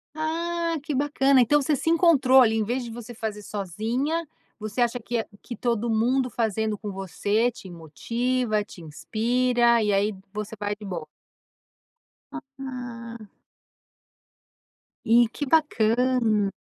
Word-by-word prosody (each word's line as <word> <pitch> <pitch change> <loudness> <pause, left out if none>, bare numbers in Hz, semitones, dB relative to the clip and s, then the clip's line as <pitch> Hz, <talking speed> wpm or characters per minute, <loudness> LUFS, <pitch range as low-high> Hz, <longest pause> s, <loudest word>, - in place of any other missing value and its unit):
Ah, 335 +2 -1
que 300 0 -3
bacana. 275 -1 +3
Então 295 +5 +4
você 290 +2 +1
se 320 - -1
encontrou 290 -7 +5
ali, 225 -2 +4
em 220 - +1
vez 245 +4 -2
de 235 - -7
você 240 +1 -9
fazer 215 -3 -4
sozinha, 225 - -2 0.3
você 215 +2 -5
acha 240 +1 +1
que 235 -1 -2 0.2
que 240 - -7
todo 235 -1 -1
mundo 250 +4 +1
fazendo 220 -2 -1
com 205 -1 -6
você 205 +5 0
te 200 - -12
motiva, 215 - -1
te 200 - -14
inspira 235 +9 +1
e 210 -1 +1
aí 200 +2 +1 0.2
você 210 +1 -5
vai 205 0 -2
de 210 0 -11
boa. 170 -5 -5 1.2
Ah. 255 -5 -8 1.9
E 235 0 +6
que 290 - -3
bacana. 235 -7 +2
235 Hz, 135 wpm, -25 LUFS, 215-265 Hz, 1.9 s, E